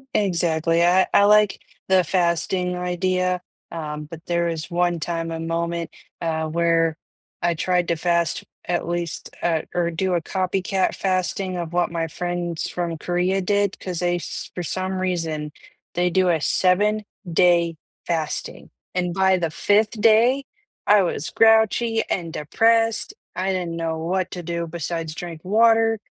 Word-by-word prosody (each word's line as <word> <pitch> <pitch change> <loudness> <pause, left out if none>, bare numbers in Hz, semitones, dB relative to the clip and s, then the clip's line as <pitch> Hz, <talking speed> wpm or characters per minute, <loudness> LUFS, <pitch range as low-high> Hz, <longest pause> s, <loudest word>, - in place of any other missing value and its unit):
Exactly, 170 -3 +2
I 185 +2 +4
I 200 - +6
like 210 -1 +4 0.3
the 190 -1 +4
fasting 180 +1 0
idea, 180 0 0 0.3
um, 150 -2 -5
but 160 +1 -10
there 170 0 +1
is 165 -2 -4
one 175 0 +1
time, 165 +1 -3
a 165 - -4
moment, 170 0 -2 0.3
uh, 160 -1 -1
where 165 0 +1 0.4
I 170 0 +1
tried 180 +1 0
to 170 - +2
fast, 170 -1 0 0.2
at 175 -1 -1
least, 170 -1 -4
uh, 165 -2 +1
or 175 -1 +1
do 185 +3 -1
a 175 - +1
copycat 190 +2 -1
fasting 185 0 -1
of 170 -1 -5
what 175 0 +1
my 165 -1 -2
friends 175 0 -3
from 170 -2 -3
Korea 180 +3 0
did, 200 +1 +1
'cause 180 -3 -4
they 175 0 +1
s 175 - -6
for 180 - -4
some 185 +2 -2
reason, 165 -5 -2 0.4
they 180 +1 +2
do 185 -1 +3
a 165 - +2
7 205 +7 +3 0.3
day 170 -1 +3 0.3
fasting, 160 -3 -3 0.2
and 180 -1 -1
by 190 -1 +3
the 165 -2 -1
5th 210 +7 +1
day, 235 +5 +4 0.4
I 205 0 +6
was 170 -4 -1
grouchy 225 +1 +4
and 170 -3 -2
depressed. 225 - +2 0.2
I 190 +1 -1
didn't 180 -3 -2
know 165 -1 -2
what 180 +3 -1
to 175 -1 -6
do 170 0 -3
besides 165 -1 -4
drink 170 -2 -7
water, 225 +2 +4
175 Hz, 155 wpm, -22 LUFS, 165-190 Hz, 0.4 s, I